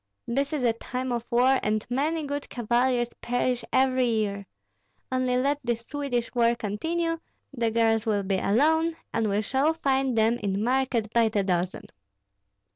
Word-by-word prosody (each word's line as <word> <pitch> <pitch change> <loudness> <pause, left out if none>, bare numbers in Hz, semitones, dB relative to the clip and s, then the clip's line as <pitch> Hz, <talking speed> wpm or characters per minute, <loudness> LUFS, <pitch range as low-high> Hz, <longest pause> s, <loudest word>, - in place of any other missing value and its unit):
This 275 +4 -1
is 300 -4 -2
a 235 -2 +3
time 250 +2 -4
of 235 -1 -2
war, 255 +3 +4
and 215 0 -1
many 300 +6 -1
good 285 0 -4
cavaliers 240 +1 +1
perish 245 0 0
every 260 -1 +3
year. 205 -3 -1 0.6
Only 255 -1 +1
let 280 +3 +1
this 235 -1 -1
Swedish 250 -2 -3
war 235 -1 +3
continue, 325 +10 -2 0.3
the 235 -3 0
girls 225 0 +2
will 205 -2 +1
be 190 0 0
alone, 320 - +2 0.2
and 225 -2 +1
we 205 +2 0
shall 275 +8 +1
find 270 -5 0
them 225 +2 +3
in 200 0 -1
market 245 -3 0
by 230 -1 +4
the 205 -2 0
dozen." 180 -1 -1
240 Hz, 160 wpm, -26 LUFS, 220-265 Hz, 0.6 s, war